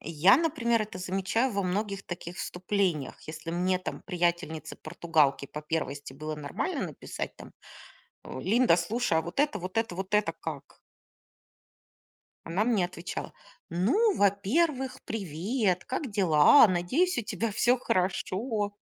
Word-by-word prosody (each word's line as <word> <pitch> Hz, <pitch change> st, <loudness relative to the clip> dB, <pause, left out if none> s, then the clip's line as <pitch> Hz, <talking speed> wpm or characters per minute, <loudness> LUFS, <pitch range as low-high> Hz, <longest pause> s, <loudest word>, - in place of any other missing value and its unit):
Я, 165 Hz, +6 st, +5 dB
например, 250 Hz, -8 st, +1 dB
это 210 Hz, -3 st, -7 dB
замечаю 195 Hz, +7 st, 0 dB
во 200 Hz, 0 st, 0 dB
многих 195 Hz, +2 st, -2 dB
таких 175 Hz, 0 st, -7 dB
вступлениях. 180 Hz, -6 st, -1 dB
Если 155 Hz, +1 st, -6 dB
мне 180 Hz, +2 st, +1 dB
там 185 Hz, -, -6 dB
приятельнице-португалке 165 Hz, -4 st, 0 dB
по 150 Hz, -, -7 dB
первости 145 Hz, -3 st, -3 dB
было 155 Hz, +2 st, -5 dB
нормально 145 Hz, -1 st, -3 dB
написать -, -, -6 dB
там, -, -, -12 dB, 0.7 s
э: -, -, -7 dB
"Линда, 215 Hz, -, +4 dB
слушай, 195 Hz, +2 st, 0 dB
а -, -, 0 dB
вот 170 Hz, +2 st, -7 dB
это, 295 Hz, 0 st, +1 dB
вот 185 Hz, +3 st, -6 dB
это, 225 Hz, -5 st, -1 dB
вот 190 Hz, +1 st, -5 dB
это 210 Hz, 0 st, +2 dB
как?" -, -, -8 dB, 1.6 s
Она 180 Hz, +6 st, 0 dB
мне 220 Hz, -6 st, +2 dB
отвечала: 175 Hz, 0 st, -6 dB, 0.4 s
"Ну, 280 Hz, -, +2 dB
во-первых, 255 Hz, -, +1 dB
привет, 195 Hz, -, -1 dB
как 260 Hz, 0 st, -3 dB
дела? 190 Hz, -, +6 dB
Надеюсь, 250 Hz, -, +1 dB
у -, -, 0 dB
тебя 225 Hz, +1 st, -2 dB
всё 240 Hz, +4 st, +3 dB
хорошо". 205 Hz, +2 st, -1 dB
185 Hz, 135 wpm, -28 LUFS, 170-225 Hz, 1.6 s, дела